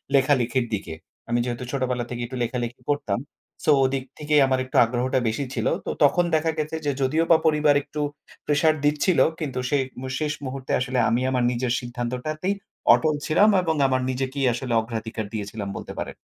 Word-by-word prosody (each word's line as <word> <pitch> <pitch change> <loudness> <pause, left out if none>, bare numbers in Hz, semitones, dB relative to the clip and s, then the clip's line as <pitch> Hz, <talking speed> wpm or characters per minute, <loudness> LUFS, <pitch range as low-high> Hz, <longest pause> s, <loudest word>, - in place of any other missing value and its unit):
লেখালেখির 130 -2 +2
দিকে। 95 -6 -3 0.4
আমি 120 0 +2
যেহেতু 120 0 -4
ছোটবেলা 125 -3 -1
থেকেই 120 -1 -4
একটু 130 +2 -6
লেখালেখি 120 0 -3
করতাম। 120 -7 -1 0.4
সো - - +4
ওদিক 130 0 -1 0.2
থেকেই 150 -1 +3
আমার 130 -1 +1
একটু 130 - -12
আগ্রহটা 125 +2 0
বেশি 115 +6 -1
ছিল। - - -1 0.2
তো, - - -3
তখন 175 +5 +4
দেখা 160 +1 +1
গেছে 155 +1 -2
যে, 145 - +2
যদিওবা 160 +5 +3
পরিবার 150 -2 +4
একটু 150 - -5 0.4
প্রেশার 150 +2 +3
দিচ্ছিল, 150 +4 +2 0.2
কিন্তু 145 -5 -3
শে 145 - +2 0.2
মু 130 - -5
শেষ 150 -1 -1
মুহূর্তে 130 0 -5
আসলে 125 0 -1
আমি 120 +2 +1
আমার 125 -1 +1
নিজের 125 0 -1
সিদ্ধান্তটাতেই 125 +9 -3 0.4
অটল 155 -1 +2
ছিলাম। 200 +7 +4
এবং 165 -3 0
আমার 130 -1 +1
নিজেকেই 135 +1 -1
আসলে 125 0 -3
অগ্রাধিকার 110 -1 -5
দিয়েছিলাম, 105 -1 -4
বলতে - - -7
পারেন। - - -4
130 Hz, 175 wpm, -24 LUFS, 120-150 Hz, 0.4 s, সো